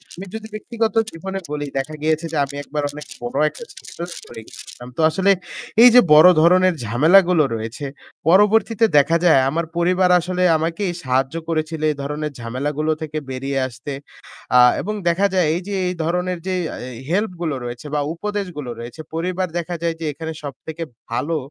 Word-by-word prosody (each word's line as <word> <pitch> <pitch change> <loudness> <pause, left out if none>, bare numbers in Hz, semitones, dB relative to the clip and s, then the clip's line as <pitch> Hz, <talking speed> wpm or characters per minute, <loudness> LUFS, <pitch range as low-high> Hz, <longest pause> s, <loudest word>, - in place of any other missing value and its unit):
আমি 185 - -8
যদি 220 0 -6
ব্যক্তিগত 225 +1 -2 0.2
জীবনে 190 +3 -5
বলি 145 -1 -3
দেখা 150 +3 -5
গিয়েছে 155 +1 0
যে 160 - -2
আমি 140 +1 -10
একবার 150 0 -4
অনেক 150 +1 -9 0.2
বড় 120 +3 -4
একটা 155 +10 -11
সিচুয়েশনে 170 0 -8
পরে 115 -1 -9
গেছিলাম। 125 - -11
তো - - 0
আসলে 190 +5 +2 0.5
এই 245 - +11
যে 250 - +10
বড় 155 +3 +9
ধরনের 185 +2 +5
ঝামেলাগুলো 165 - +5
রয়েছে 115 +5 -5 0.4
পরবর্তীতে 215 +4 +4
দেখা 165 +4 +4
যায় 160 -6 +6
আমার 165 +4 -1
পরিবার 180 +1 +2
আসলে 180 +1 -2
আমাকেই 170 +4 -2
সাহায্য 130 +2 0
করেছিলে 155 -1 -1
এই 150 - -6
ধরনের 150 +2 -3
ঝামেলাগুলো 140 +6 -2
থেকে 155 -1 -4
বেরিয়ে 135 +1 -2
আসতে। 125 +3 -8 0.6
আহ 125 0 +7
এবং 210 - -3 0.2
দেখা 180 +4 +2
যায় 180 -4 +3
এই 175 - -2
যে 205 - -4
এই 180 - -2
ধরনের 180 +2 -1
যে 185 - 0
এহ - - -7 0.3
হেল্পগুলো 175 -5 -1
রয়েছে 120 +4 -7
বা - - +2
উপদেশগুলো 180 -7 -4
রয়েছে 120 +7 -8
পরিবার 180 +3 -1
দেখা 175 +1 -4
যায় 165 -1 0
যে 165 - -4
এখানে 160 +2 -6
সবথেকে 155 +4 -7 0.3
ভালো 155 +7 -1
165 Hz, 170 wpm, -20 LUFS, 145-185 Hz, 0.6 s, এই